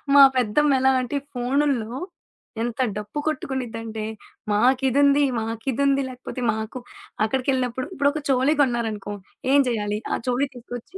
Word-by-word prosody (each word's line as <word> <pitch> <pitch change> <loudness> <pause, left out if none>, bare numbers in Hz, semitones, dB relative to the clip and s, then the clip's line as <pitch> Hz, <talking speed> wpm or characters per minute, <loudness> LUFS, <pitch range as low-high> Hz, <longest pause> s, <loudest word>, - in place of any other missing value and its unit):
మా 280 - +10
పెద్దమ్మెలా 265 +3 +3
అంటే 255 +3 -4
ఈ - - -27
ఫోనుల్లో, 255 -1 0 0.6
ఎంత 240 +1 -4 0.2
డప్పు 210 +8 -5
కొట్టుకునిద్దంటే 230 -6 -3 0.5
"మాకిదుంది, 270 +5 +4 0.2
మాకిదుంది 265 +5 0
లేకపోతే 255 0 -7
మాకు 220 +3 -5 0.5
అక్కడికెళ్ళినప్పుడు" 255 +1 -1
ఇప్పుడొక 290 -1 +1
చెవులయి 270 +3 +3
కొన్నారనుకో, 225 -6 -1 0.4
ఏం 285 - +6
చేయాలి? 210 -2 -1
ఆ - - +1
చెవులయి 260 +3 0
తీసుకొచ్చి 245 +7 -9
255 Hz, 115 wpm, -24 LUFS, 225-275 Hz, 0.6 s, మా